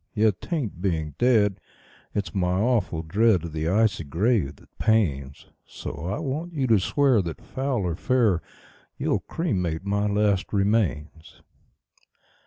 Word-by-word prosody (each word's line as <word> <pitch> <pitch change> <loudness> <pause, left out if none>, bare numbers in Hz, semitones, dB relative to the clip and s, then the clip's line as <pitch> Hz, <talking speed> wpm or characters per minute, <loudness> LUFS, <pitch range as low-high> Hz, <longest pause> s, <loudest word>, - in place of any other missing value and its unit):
Yet 105 -3 +2
'tain't 130 - -3
being 80 -6 -1
dead 110 -6 +3 0.6
it's 100 -1 -2
my 90 -1 +1
awful 105 -8 +1
dread 100 +3 +3
of 85 -2 -6
the 80 +1 -1
icy 105 -2 +2
grave 85 - 0
that - - -24
pains; 70 - 0 0.2
So - - -7
I 100 - -2
want 155 +4 -4
you 140 -4 0
to 115 -5 +4
swear 130 +3 +3
that, 85 -3 -5
foul 130 -5 -2
or 85 -2 -1
fair, 115 -5 +2 0.6
you'll - - 0
cremate 90 - -2
my 100 +1 0
last 100 -1 +1
remains." 85 - -1
100 Hz, 140 wpm, -25 LUFS, 85-115 Hz, 0.6 s, to